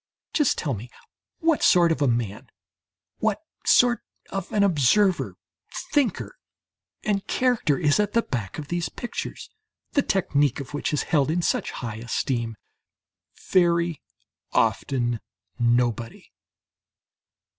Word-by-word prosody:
Just 295 -5 +2
tell 145 -5 -1
me 115 +3 -7 0.5
what 325 -2 +2
sort 175 -2 +5
of 160 - -1
a 140 - +4
man, 115 -4 -2 0.7
what - - +1 0.3
sort 245 -1 +5 0.3
of 195 -2 -4
an 205 - +3
observer, 190 +3 +3 0.6
thinker 290 - 0 0.6
and 200 -2 -1
character, 245 - +2
is 150 +1 +2
at 210 -1 +1
the 230 - +3
back 110 -7 -4
of 150 -2 -7
these 175 -1 -1
pictures, 240 - -6 0.4
the 285 - +3
technique 145 - +1
of 140 +1 -8
which 145 - -2
is 150 - 0
held 150 -4 +2
in 170 +2 0
such - - 0
high 115 -3 -5
esteem? 115 0 -2 1.0
Very 170 -3 +3 0.5
often 120 +2 +1 0.4
nobody. 120 -1 0
155 Hz, 125 wpm, -25 LUFS, 120-195 Hz, 1.0 s, sort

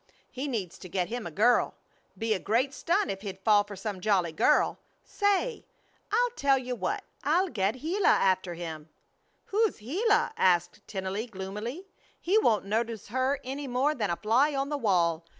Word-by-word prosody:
He 265 +3 -4
needs 210 -10 -4
to 185 - -10
get 180 0 -1
him 240 -4 -4
a - - -5
girl. 225 +9 +3 0.4
Be 225 -1 0
a 195 - -1
great 250 +8 +1
stunt 390 +8 0
if 195 0 -6
he'd 195 -2 -6
fall 205 +1 +4
for 205 0 -9
some 195 -1 -5
jolly 185 -5 +2
girl. 295 - +2 0.2
Say! 405 +4 0 0.5
I'll 485 +3 +2
tell 280 - +2
you 255 -1 -4
what. 405 - -2 0.2
I'll 350 +6 +2
get 210 +1 -1
Gila 365 +6 0
after 185 -2 +3
him." 160 -2 -7 0.6
"Who's 435 +1 +1
Gila?" 420 - +1
asked 175 -1 +2
Tennelly, 195 +3 -3
gloomily. 210 - -6 0.3
"He 395 +5 +3
won't 215 - +2
notice 225 +1 -2
her 260 +4 0
any 275 +2 -5
more 260 +4 +1
than 215 -8 -2
a 170 - +1
fly 255 - +2
on 275 +1 -1
the 295 - -1
wall. 170 -7 +2
230 Hz, 175 wpm, -28 LUFS, 190-290 Hz, 0.6 s, fall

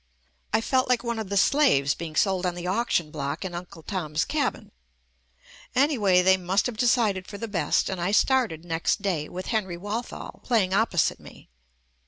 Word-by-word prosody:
I 220 - +2
felt 255 +2 +1
like 250 -1 +2
one 235 -1 -2
of 215 -4 -5
the 200 - -1
slaves 195 - +4
being 165 -2 -7
sold 190 0 +2
on 180 -1 -1
the 175 0 -6
auction 185 -5 0
block 140 +3 -4
in 180 - -5
"Uncle 175 -2 -8
Tom's 160 -4 -2
Cabin." 290 -3 -2 1.0
Any 285 +3 +3
way, 190 -5 +3
they 190 +1 +5
must 185 +2 0
have 245 - -2
decided 215 -5 +1
for 205 - -8
the 230 - -5
best 200 -5 +1
and 190 -2 -3
I 180 +3 0
started 215 -8 +2
next 165 +4 -1
day 170 -7 -1
with 185 +1 -6
Henry 190 -6 -1
Walthall 205 +6 -6
play 230 -5 +2
ing 185 0 -3
opposite 195 -6 +1
me. - - -15
190 Hz, 190 wpm, -26 LUFS, 175-230 Hz, 1.0 s, they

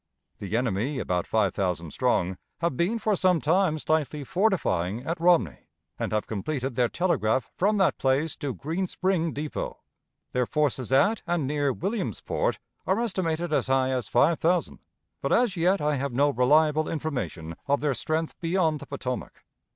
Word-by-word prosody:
The 100 +3 -2
enemy, 120 +4 -1
about 90 -7 -1
five 105 -5 +1
thousand 90 -4 -2
strong, 90 +5 0 0.2
have 170 -5 0
been 180 - +1
for 215 -2 +1
some 185 -2 +3
time 160 +2 +2
slightly 150 -1 -1
fortifying 125 - 0
at 165 +2 -2
Romney, 165 - +2 0.3
and - - -2
have 110 0 0
completed 130 +5 -3
their 120 0 +2
telegraph 130 - 0
from 210 +3 +2
that 190 -3 +2
place 135 +3 +1
to 145 - -3
Green 165 - -2
Spring 180 -3 0
Depot. 150 +2 -4 0.5
Their 125 -1 0
forces 140 -5 0
at 190 +11 +3
and 170 -4 0
near 145 0 0
Williamsport 210 - -2 0.3
are 190 +4 +2
estimated 175 -7 -1
as - - +1
high 130 0 +2
as 125 -4 -1
five 160 +7 +3
thousand, 175 +1 +1 0.4
but - - -1
as 240 -6 +3
yet 180 +3 +2
I 150 -1 +1
have 140 -1 -3
no 145 +3 +3
reliable 150 +5 +3
information 125 - -4
of 140 0 +2
their 145 -2 +1
strength 155 +6 -2
beyond 165 -3 +1
the - - -10
Potomac. 125 -3 -5
150 Hz, 165 wpm, -26 LUFS, 125-175 Hz, 0.5 s, some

